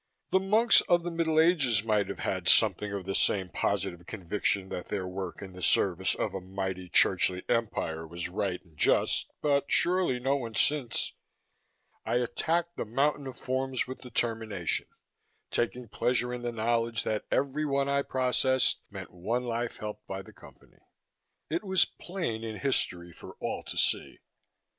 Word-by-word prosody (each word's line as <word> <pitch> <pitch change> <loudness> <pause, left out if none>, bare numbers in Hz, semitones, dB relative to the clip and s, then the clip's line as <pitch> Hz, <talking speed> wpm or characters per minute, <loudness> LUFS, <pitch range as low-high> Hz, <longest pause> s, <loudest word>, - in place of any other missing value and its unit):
The 190 - +5
monks 215 +5 +5
of 175 -1 +4
the 175 - -3
Middle 165 -1 +2
Ages 145 - +4
might 105 -3 +2
have - - -5
had - - -2
something 105 -1 +4
of 100 -2 -4
the 95 - -2
same 95 -1 +1
positive 95 -2 -2
conviction 95 0 -1
that 90 - -5
their 95 -3 -2
work 95 +1 -5
in 95 -2 -9
the 90 - -10
service 95 +1 +3
of - - -2
a 95 - -4
mighty 95 -1 -4
churchly 90 +1 +3
empire 80 -9 -1
was 85 +1 -4
right 95 -1 -2
and 80 -3 -23
just, - - +2
but 140 -2 +3
surely 175 -8 +2
no 135 +3 +1
one 115 -4 -6
since. 140 -6 +1 0.9
I - - -1
attacked 165 +8 0
the - - -1
mountain 140 +5 0
of 130 -2 -7
forms 130 0 -1
with 130 +1 -8
determination, 110 -6 -1 0.6
taking 120 +1 -1
pleasure 125 +3 0
in 125 - -4
the 120 0 -2
knowledge 115 0 0
that 110 -1 -2
every 140 +3 0
one 140 0 +1
I 140 0 +2
processed 130 -1 +1
meant - - -8
one 110 +8 -2
life 120 0 -2
helped 105 0 -7
by 95 0 -5
the - - -15
Company. - - -17 0.7
It 165 +5 -2
was 190 -3 +3
plain 170 -12 -4
in 110 -1 -5
history, 90 -10 -1
for - - -12
all - - -3
to - - -6
see. - - 0
115 Hz, 165 wpm, -29 LUFS, 95-140 Hz, 0.9 s, The